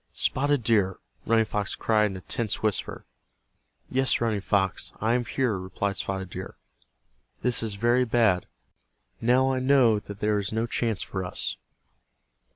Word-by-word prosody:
"Spotted 145 -1 +2
Deer!" 105 -5 +2 0.3
Running 115 0 +4
Fox 105 -1 -2
cried 110 -1 +2
in 95 - -6
a - - -9
tense 110 +2 -3
whisper. 110 -2 -2 0.8
"Yes, 130 +1 +2
Running 110 -3 0
Fox, 95 -1 0
I 110 +2 +1
am 120 0 +1
here," 125 -3 0
replied 100 +2 -3
Spotted 95 -2 -3
Deer. 95 +1 -7 0.9
"This 125 -1 +2
is 110 -3 -3
very 120 +4 +3
bad. 110 -6 +2 0.7
Now 130 +3 +3
I 130 - 0
know 130 -5 +4
that 100 -1 -10
there 105 0 +1
is 100 - -3
no 110 +1 0
chance 115 -3 -1
for 95 -1 -4
us." 90 - -2
110 Hz, 155 wpm, -26 LUFS, 100-120 Hz, 0.9 s, Running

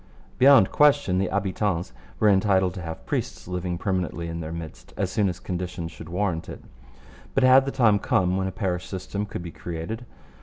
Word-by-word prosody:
Beyond 135 +1 +7
question 145 -11 +4
the 95 - +1
habitants 95 - -1 0.3
were 110 - +4
entitled 95 -2 +3
to 95 - -7
have 80 -1 -7
priests - - -3
living 90 -1 -3
permanently 90 -3 -2
in 85 0 -4
their 80 -1 -5
midst, 80 -1 -9
as 95 - -1
soon 100 -1 +2
as 90 0 -5
conditions 90 -2 -4
should 80 - -11
warrant 90 -2 -2
it. - - -9 0.7
But 135 - +3
had 130 +1 +7
the 135 - -2
time 115 -7 +3
come 90 -1 +1
when 95 0 0
a - - -3
parish 90 -3 -2
system 100 +2 -4
could 95 - -6
be 85 - -7
created? 90 +10 -6
95 Hz, 190 wpm, -25 LUFS, 85-105 Hz, 0.7 s, Beyond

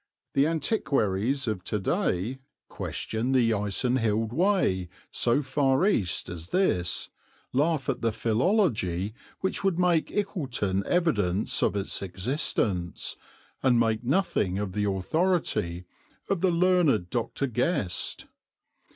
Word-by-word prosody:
The 140 +2 +3
antiquaries 135 - 0
of 105 -5 -2
to 105 - -1
day 100 +4 -1 0.3
question 115 +4 -3
the 120 -3 +4
Icenhilde 110 +1 0
Way 160 - +1 0.2
so 125 +5 +2
far 135 +3 +2
east 100 - +1
as 85 0 -7
this, 90 - +1 0.4
laugh 145 0 +1
at - - -1
the 115 - +1
philology 110 - +1 0.3
which 190 - -1
would 195 -3 +1
make 175 -3 +2
Ickleton 130 - -1
evidence 105 - +1
of - - +2
its 100 -1 -2
existence, 95 - -1 0.5
and 125 -3 +4
make 115 0 +1
nothing 125 - +1
of 100 -2 -2
the 105 +2 -1
authority 95 - 0 0.4
of 195 -4 -1
the 190 - +4
learned 170 - +2
Dr. 120 +3 -1
Guest. 125 - 0
120 Hz, 115 wpm, -27 LUFS, 100-160 Hz, 0.5 s, the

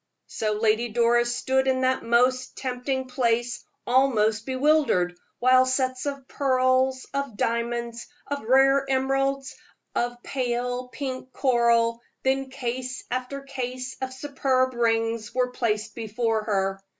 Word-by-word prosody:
So 215 -1 -2
Lady 220 +2 +1
Doris 240 +1 +2
stood 265 +1 +1
in 260 0 +2
that 260 0 +2
most 250 +2 +2
tempting 260 0 -2
place, 240 -1 0 0.2
almost 230 -4 +2
bewildered, 260 - +2 0.2
while 255 +1 +5
sets 255 +1 0
of 275 -2 -5
pearls, 260 -1 +1
of 275 -6 -3
diamonds, 235 +1 -2 0.2
of 285 0 -3
rare 270 +3 +4
emeralds, 270 +1 0 0.4
of 240 0 -1
pale 250 -1 -2
pink 260 0 -6
coral, 235 -3 +2 0.2
then 265 0 +1
case 255 0 -4
after 255 +2 -3
case 255 -1 -5
of 260 0 -3
superb 260 -1 0
rings, 225 -1 0
were 250 -1 +1
placed 215 -3 -1
before 225 -1 -1
her. 195 -2 0
255 Hz, 125 wpm, -25 LUFS, 235-265 Hz, 0.4 s, while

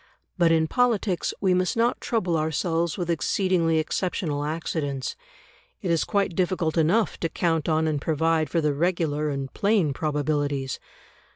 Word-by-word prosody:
But 170 -3 +3
in 160 -1 +3
politics 225 -5 +1
we 190 -2 +3
must 185 +3 +1
not 235 +1 +1
trouble 205 -10 0
ourselves 165 +1 0
with 175 -3 -2
exceedingly 170 -1 +1
exceptional 155 -2 -1
accidents; 150 -3 -3 0.7
it 180 - 0
is 165 - +2
quite 200 -4 0
difficult 180 -3 0
enough 175 +7 +2
to 165 - -1
count 165 -2 0
on 160 0 +2
and 150 -3 -1
provide 160 0 +1
for 165 - +1
the 150 -1 +1
regular 155 -2 0
and 135 -2 -4
plain 200 -8 +2
probabilities. 145 -2 -1
165 Hz, 150 wpm, -25 LUFS, 150-180 Hz, 0.7 s, But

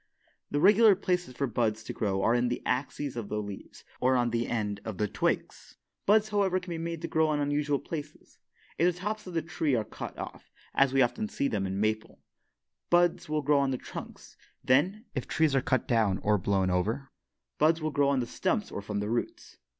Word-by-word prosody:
The 145 - 0
regular 205 +4 +7
places 180 -8 -1
for 140 - 0
buds 110 -3 -1
to - - -6
grow 95 -3 -1
are 115 - +4
in 120 0 +2
the 120 - -3
axes 135 +1 -2
of 115 -4 -5
the 105 - -1
leaves 100 -2 -8 0.2
or 130 +1 +3
on 120 -1 +2
the 115 0 0
end 105 -3 -2
of 110 -4 -5
the 105 - +1
twigs. - - -2 0.3
Buds, 215 +1 +4
however, 195 -3 +2
can 180 -1 -9
be 165 - -3
made 165 0 -4
to - - -1
grow 160 -1 +2
on 150 -1 0
unusual 145 0 +1
places. 150 +1 -8 0.4
If 175 +1 +3
the - - -12
tops 210 +1 -3
of 180 - -7
the 165 - 0
tree 155 -5 0
are 110 - +1
cut - - -8
off, - - -8 0.2
as 135 -1 +4
we 135 0 +4
often 215 - -1
see 140 - -1
them 100 -6 -1
in 95 - -3
the - - -2
maple, 110 0 -1 0.7
buds 175 -2 +3
will 155 -1 0
grow 145 0 +4
on 140 -1 +2
the 130 - -1
trunks. - - -10 0.3
Then, 185 - +2
if 130 - -3
trees 155 -3 +2
are 135 - +3
cut 130 0 0
down 110 -6 +2
or 105 -1 +3
blown 95 0 +1
over, 110 +10 -1 0.5
buds 160 +2 +4
will 155 -1 -2
grow 140 0 +2
on 135 -2 +2
the - - -2
stumps 190 - -1
or - - -4
from 105 0 -3
the 105 - -2
roots. 120 - -4
140 Hz, 220 wpm, -29 LUFS, 110-165 Hz, 0.7 s, regular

